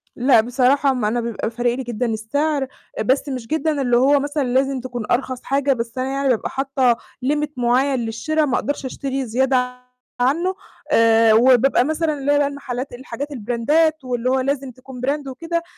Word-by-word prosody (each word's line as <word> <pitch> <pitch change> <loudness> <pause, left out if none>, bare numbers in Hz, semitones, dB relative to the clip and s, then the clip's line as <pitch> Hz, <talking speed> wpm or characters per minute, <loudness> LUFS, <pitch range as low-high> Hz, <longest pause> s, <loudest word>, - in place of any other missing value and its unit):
لأ، 245 -2 +4
بصراحة 260 +4 +2
ما 245 -5 -1
أنا 240 +3 0
بيبقى 230 -2 -3
فارق 240 +1 0
لي 265 - -4
جدًا 240 0 -3
السعر، 270 +6 -1 0.4
بس 265 +5 +1
مش 250 -4 -5
جدًا 310 0 0
اللي 245 -2 +2
هو 280 +3 +4
مثلًا 290 +1 -2
لازم 265 +1 +1
تكون 245 -2 -5
أرخص 255 0 -1
حاجة، 275 0 +1
بس 230 -1 -5
أنا 255 0 -1
يعني 275 0 0
بابقى 240 -4 0
حاطة 270 -3 +1 0.3
limit 295 +2 0
مُعين 255 +2 +2
للشِرا، 300 +8 -1
ما 260 -3 0
أقدرش 285 0 -2
أشتري 270 +1 -3
زيادة 250 +1 0 0.4
عنه، 330 +10 +1 0.4
آآ 225 -1 +5
وبيبقى 250 +2 +5
مثلًا 315 +1 0
اللي 280 +1 0
هو - - +3
بقى 290 -1 +2
المحلات 275 -2 -5
الحاجات 260 +3 -6
البراندات 285 +6 +1
واللي 250 -1 -2
هو 260 +1 +2
لازم 275 0 -2
تكون 255 0 -11
brand 285 0 -1
وكده. 335 +6 -3
260 Hz, 180 wpm, -20 LUFS, 245-280 Hz, 0.4 s, آآ